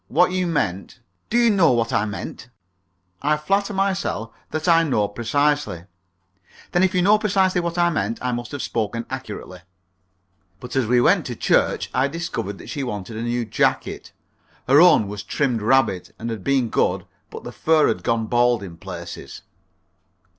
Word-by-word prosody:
What 180 0 +3
you 185 -1 0
meant 110 - -2
" - - -47
"Do 235 - +1
you 235 -1 +5
know 170 -9 +4
what 115 -1 0
I 100 - +2
meant?" 105 +3 -7 0.7
"I 150 +2 +2
flatter 195 +7 0
myself 190 - -1 0.2
that 155 +2 -3
I 165 -1 +6
know 125 -10 +1
precisely 120 - 0 0.4
" 95 -2 -26
"Then 175 - +2
if 190 0 +2
you 180 - +3
know 210 +3 +5
precisely 190 -3 +2
what 170 0 -3
I 175 0 +3
meant, 115 -6 -1
I 125 - -2
must 120 0 -4
have 145 - -4
spoken 115 +1 -2
accurately." 105 -8 -7 1.0
But 125 +1 -8
as 130 -4 +1
we 125 +1 +4
went - - +3
to - - -5
church - - +1
I 130 +2 +2
discovered 140 - -4
that - - -11
she 145 - -3
wanted 105 -3 -5
a 110 - -4
new 120 0 -1
jacket. 105 - -1 0.6
Her 140 +4 +6
own 175 - +6
was 105 0 -6
trimmed 125 -4 -1
rabbit, 110 -6 +1
and 115 +1 -5
had 110 -4 -6
been 135 -4 +1
good, - - 0 0.2
but - - -9
the - - -7
fur 160 -1 +3
had - - -1
gone 115 -1 0
bald 120 -1 +2
in 85 -4 -9
places. 85 -1 -8
125 Hz, 180 wpm, -22 LUFS, 110-170 Hz, 1.0 s, I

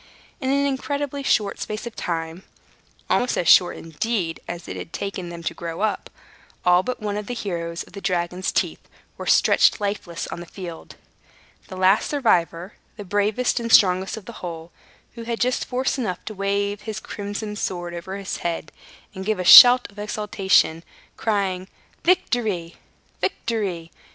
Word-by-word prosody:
In 260 -4 -2
an 280 +1 +2
incredibly 280 +1 -2
short 210 -7 +1
space 215 +2 -5
of 235 - -7
time 165 0 -4 0.7
(almost 245 - +1
as 175 - -1
short, 180 - +6
indeed, 165 +1 -3
as 175 -1 -6
it - - -6
had - - -7
taken 195 -3 -4
them 170 -1 -8
to - - -2
grow 165 +1 -6
up), 215 -1 -1 0.6
all 180 0 +5
but 250 +6 -4
one 210 -2 -3
of 210 -1 -5
the 245 - -4
heroes 170 -6 -4
of - - -19
the 200 - -8
dragon's 180 0 -1
teeth - - -1 0.4
were - - -8
stretched - - +4
lifeless 200 -5 -3
on - - -6
the 175 - -9
field. 175 -4 -9 0.7
The 185 - -8
last 190 +2 +3
survivor, 180 - +1 0.2
the 205 - -6
bravest 205 +6 +1
and 230 -1 -4
strongest 190 0 +4
of 215 - -10
the 235 - -8
whole, 165 -1 -7 0.4
had 230 0 -4
just 250 +1 0
force 260 +2 -1
enough 185 -8 -3
to 215 - -5
wave 200 +1 -1
his 215 -1 -5
crimson 205 +1 -5
sword 175 -4 -4
over 190 +3 -6
his 195 -1 -4
head 170 -2 -4 0.4
and 190 -1 -6
give 215 +2 0
a 180 - -2
shout 245 +6 +10
of 205 - -14
exultation, 200 -5 +1 0.3
crying, 195 -4 -1 0.4
"Victory! 220 - 0 0.4
Victory! 195 - -2
200 Hz, 165 wpm, -23 LUFS, 175-225 Hz, 0.7 s, shout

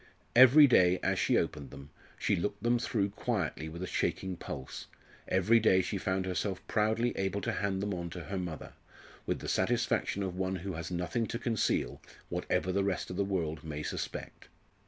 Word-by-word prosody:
Every 130 +5 +9
day, 90 -8 +5
as - - +1
she - - +3
opened 70 -3 -2
them, 70 +2 -11 0.3
she - - +1
looked 85 +4 -3
them 120 +1 +3
through 100 -4 0
quietly 80 -4 -2
with 85 +3 -6
a - - -1
shaking 95 +1 -1
pulse; 65 -5 -7 0.4
every 95 +5 +4
day 95 -4 +4
she 95 +2 -3
found 95 0 -1
herself 95 +1 -2
proudly 110 +3 +1
able 95 +1 -1
to - - -1
hand 100 -1 -1
them 105 -1 -1
on 85 -1 -4
to 85 +1 -7
her 95 +1 -4
mother, 85 -5 -6 0.5
with - - 0
the - - -6
satisfaction 100 - +1
of 95 -2 -3
one 95 0 -1
who 95 +1 -5
has 80 0 -5
nothing 90 +6 -1
to 115 - -3
conceal, 115 -3 0 0.3
whatever 95 - -1
the 100 +1 +1
rest 95 -2 -2
of - - -5
the 100 - +1
world 80 -6 -2
may 75 -1 -5
suspect. - - -5
95 Hz, 190 wpm, -31 LUFS, 85-100 Hz, 0.5 s, Every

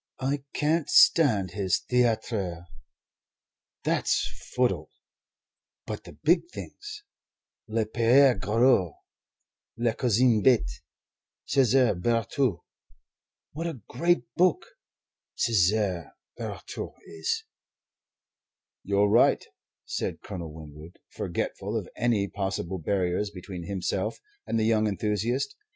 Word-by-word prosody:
I 135 +2 -1
can't 155 +1 +1
stand 110 - +5
his 95 -2 +1
'Theatre' 110 -8 0 1.2
that's - - +1 0.3
footle 95 -12 +1 1.0
but - - -6
the - - -11
big 170 - +2
things 420 +1 -9 0.6
'Le 110 0 0
Pere 125 +5 +5
Goriot,' 105 - +2 0.8
'La 115 -1 +1
Cousine 120 -1 +3
Bette,' 125 +1 +2 0.6
'Cesar 130 -2 +3
Birotteau' 115 +2 0 0.9
what 165 +3 -4
a 160 -7 -5
great 175 +1 +1
book 185 - +2 0.7
'Cesar 100 -4 +1 0.2
Birotteau' - - -6
is! 80 -1 -3 0.7
" - - -66
"You're 100 +1 +2
right," 110 +4 +4 0.4
said - - -4
Colonel 85 -6 -6
Winwood, 75 +1 -12
forgetful - - -3
of - - -4
any 110 -4 +1
possible 95 -2 -3
barriers 90 +3 0
between 90 -3 -8
himself 95 +2 -2 0.3
and 115 - 0
the 110 - +1
young 110 -1 +3
enthusiast. 110 +7 -1
110 Hz, 100 wpm, -27 LUFS, 95-125 Hz, 1.2 s, stand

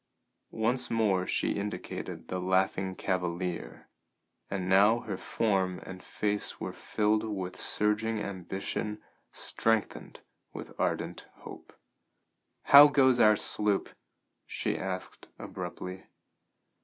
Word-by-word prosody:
Once 120 +3 0
more 100 -5 +1
she - - 0
indicated 105 +1 -5
the 90 - -3
"Laughing 95 +1 0
Cavalier," 90 -2 -3 0.6
and 95 -2 -3
now 100 +5 +5
her 105 - -4
form 95 -2 -1
and 95 0 -9
face 105 +1 -1
were - - -5
filled 105 0 0
with 95 -4 -4
surging 105 +1 0
ambition 100 +2 -4 0.3
strengthened 115 -2 -2 0.3
with - - -8
ardent - - -2
hope. - - -12 0.8
"How 145 +1 +10
goes 130 -4 +4
our 110 -2 +6
sloop?" 105 -1 +1 0.6
she - - -2
asked 95 -1 -5
abruptly. 90 +1 -7
100 Hz, 105 wpm, -29 LUFS, 95-110 Hz, 0.8 s, How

